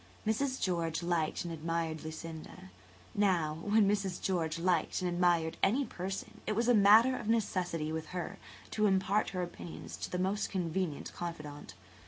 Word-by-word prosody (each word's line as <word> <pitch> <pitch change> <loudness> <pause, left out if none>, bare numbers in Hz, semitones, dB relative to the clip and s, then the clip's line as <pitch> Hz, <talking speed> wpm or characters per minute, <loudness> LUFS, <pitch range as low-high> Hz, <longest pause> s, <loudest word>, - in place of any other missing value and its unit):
Mrs. 255 +5 0
George 170 -2 0
liked 170 -1 0
and 170 - -4
admired 165 0 -2
Lucinda. 160 - -8 0.4
Now, 170 -6 +2
when 205 +2 +4
Mrs. 195 -3 0
George 165 -4 0
liked 175 -1 +1
and 185 - -1
admired 175 -2 +2
any 250 +8 +3
person, 190 -1 -5
it 215 - 0
was 230 +2 +1
a 245 - +6
matter 220 +5 +7
of 235 - -5
necessity 180 -8 0
with 160 0 -3
her 180 -1 -5 0.3
to 215 -1 +2
impart 195 +2 +2
her 185 -1 -2
opinions 175 -1 -7
to - - -5
the 180 - -2
most 195 +3 0
convenient 175 -4 -2
confidant. 150 - -6
180 Hz, 160 wpm, -32 LUFS, 165-200 Hz, 0.4 s, matter